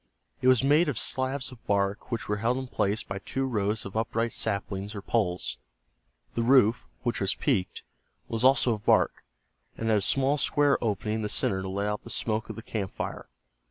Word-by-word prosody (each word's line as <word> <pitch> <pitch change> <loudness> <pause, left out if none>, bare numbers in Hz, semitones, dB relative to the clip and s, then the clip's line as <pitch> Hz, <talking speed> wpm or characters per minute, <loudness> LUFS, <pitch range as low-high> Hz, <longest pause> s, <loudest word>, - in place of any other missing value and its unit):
It 130 - +2
was 130 -1 +5
made 150 +4 +4
of 135 - -2
slabs 130 +2 0
of 120 -3 -14
bark 100 +3 0
which 115 -2 -3
were 105 - 0
held 115 +4 +1
in 130 - -3
place 105 -4 0
by 95 0 -5
two 135 +6 -2
rows 105 -3 -1
of 100 - -8
upright 115 +1 -1
saplings 100 0 -2
or 100 - -5
poles. 95 -7 -1 0.8
The 115 - -1
roof, 120 -1 +4 0.2
which 120 -4 -1
was 95 - +1
peaked, 110 -11 -1 0.4
was 115 +1 -3
also 130 -2 +5
of 105 -1 -6
bark, - - +3 0.5
and 115 - -2
had 110 -1 +4
a - - -4
small 135 +7 +3
square 145 -2 +2
opening 105 0 -1
in - - -3
the 105 - -2
center 100 -7 0
to 95 - -5
let 100 +2 -2
out 105 0 -2
the - - -10
smoke 110 -1 -1
of - - -5
the 115 - -8
camp 105 -5 -4
fire. - - -5
110 Hz, 205 wpm, -28 LUFS, 100-130 Hz, 0.8 s, was